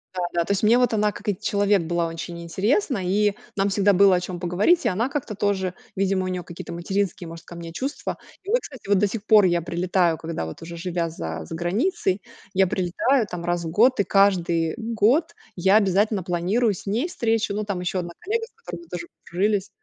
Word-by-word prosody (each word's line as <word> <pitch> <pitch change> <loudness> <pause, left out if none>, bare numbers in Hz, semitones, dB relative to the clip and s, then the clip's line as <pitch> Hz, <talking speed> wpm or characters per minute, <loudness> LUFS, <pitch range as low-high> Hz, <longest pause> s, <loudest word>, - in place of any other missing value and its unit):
Да 180 - -2
да. 170 - +2
То - - -2
есть 200 +1 0
мне 225 +3 +6
вот 250 -2 +2
она, 210 -1 +2
как 210 - -12
и 200 - 0
человек, 205 -1 +2
была 170 0 0
очень 170 +1 -6
интересна, 215 - 0
и 205 +3 +2 0.2
нам 195 0 +1
всегда 200 0 +3
было 195 0 +6
о - - +2
чём 180 0 -6
поговорить, 190 - +2
и - - +4
она 215 +6 0
как-то 275 -7 -4
тоже, 190 -2 0 0.2
видимо, 190 -1 +1
у - - -2
неё 180 -1 -3
какие-то 170 0 -8
материнские, 180 +1 -2
может, 165 0 -10
ко 175 - -10
мне 170 -1 -7
чувства. 265 +11 -4 0.3
И 395 - -9
вот, 485 +3 +4
кстати, 260 - -11
вот 200 - +5
до 205 +2 +3
сих 205 +1 -5
пор 215 -3 +6
я 175 -1 +2
прилетаю, 175 0 +1
когда 160 - -4
вот 80 - -8
уже, 170 +1 -8
живя 170 -1 -2
за 80 - -5
заграницей, 190 - -1 0.3
я 190 0 +4
прилетаю 200 +8 +1
там 170 -1 -5
раз 175 -1 -1
в - - -3
год, 235 +7 +4
и - - +5
каждый 175 -5 +2
год 230 +7 +1 0.2
я 190 +3 +4
обязательно 200 0 +2
планирую 185 +7 +1
с 180 - -10
ней 225 - 0
встречу. 225 - 0
Ну, 210 +1 -2
там 200 -3 -3
ещё 180 +1 -2
1 175 -1 -5
коллега, 450 +4 -2
с 455 - -23
которой 175 -1 -7
мы - - -17
тоже 170 -1 -5 0.2
подружились. 200 +2 0
190 Hz, 220 wpm, -24 LUFS, 175-210 Hz, 0.3 s, мне